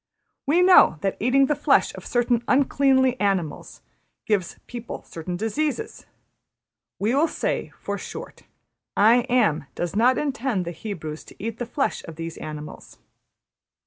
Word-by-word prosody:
``We 350 Hz, +4 st, +5 dB
know 365 Hz, -, +7 dB
that 195 Hz, -, -1 dB
eating 260 Hz, +4 st, +4 dB
the 295 Hz, -, +1 dB
flesh 290 Hz, -, +3 dB
of -, -, -9 dB
certain 240 Hz, -1 st, +1 dB
uncleanly 260 Hz, -1 st, +3 dB
animals 190 Hz, -7 st, -2 dB, 0.4 s
gives 200 Hz, -6 st, -1 dB
people 240 Hz, -1 st, -7 dB
certain 175 Hz, +2 st, -6 dB
diseases; 300 Hz, -, -3 dB, 0.9 s
we 215 Hz, +4 st, 0 dB
will 295 Hz, +5 st, +3 dB
say, -, -, -2 dB
for -, -, -4 dB
short, -, -, -8 dB, 0.6 s
`I 235 Hz, +5 st, +5 dB
Am' 215 Hz, -, +2 dB
does 175 Hz, +1 st, -3 dB
not 245 Hz, +4 st, +4 dB
intend 265 Hz, -9 st, -1 dB
the 170 Hz, -, -4 dB
Hebrews 160 Hz, -5 st, -6 dB
to -, -, -14 dB
eat 225 Hz, +1 st, -5 dB
the 245 Hz, -, -3 dB
flesh 275 Hz, +3 st, -1 dB
of 165 Hz, -, -9 dB
those 165 Hz, 0 st, -6 dB
animals. 150 Hz, -1 st, -8 dB
230 Hz, 145 wpm, -24 LUFS, 180-265 Hz, 0.9 s, know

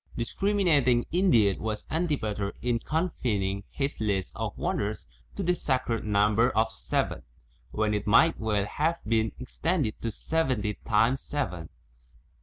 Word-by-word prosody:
Discriminating 145 Hz, -, +2 dB
indeed 140 Hz, -, +3 dB
was 110 Hz, -1 st, -3 dB
Antipater 110 Hz, -, -1 dB
in 120 Hz, -1 st, +1 dB
confin 140 Hz, -, -1 dB
ing 100 Hz, +1 st, -2 dB
his 140 Hz, 0 st, -3 dB
list 100 Hz, -4 st, -1 dB
of -, -, -4 dB
wonders -, -, -2 dB, 0.3 s
to -, -, -3 dB
the 180 Hz, -, +2 dB
sacred 130 Hz, -8 st, -1 dB
number 105 Hz, +3 st, +3 dB
of 110 Hz, 0 st, +3 dB
seven, -, -, -2 dB, 0.5 s
when 105 Hz, +4 st, 0 dB
it 105 Hz, 0 st, -2 dB
might 160 Hz, +10 st, +5 dB
well 105 Hz, -3 st, 0 dB
have 160 Hz, +9 st, 0 dB
been 110 Hz, 0 st, +1 dB
extended 135 Hz, -1 st, -2 dB
to 115 Hz, -, -2 dB
seventy 130 Hz, -9 st, -1 dB
times 115 Hz, +4 st, +3 dB
seven. 90 Hz, -, -4 dB
115 Hz, 135 wpm, -28 LUFS, 105-150 Hz, 0.5 s, might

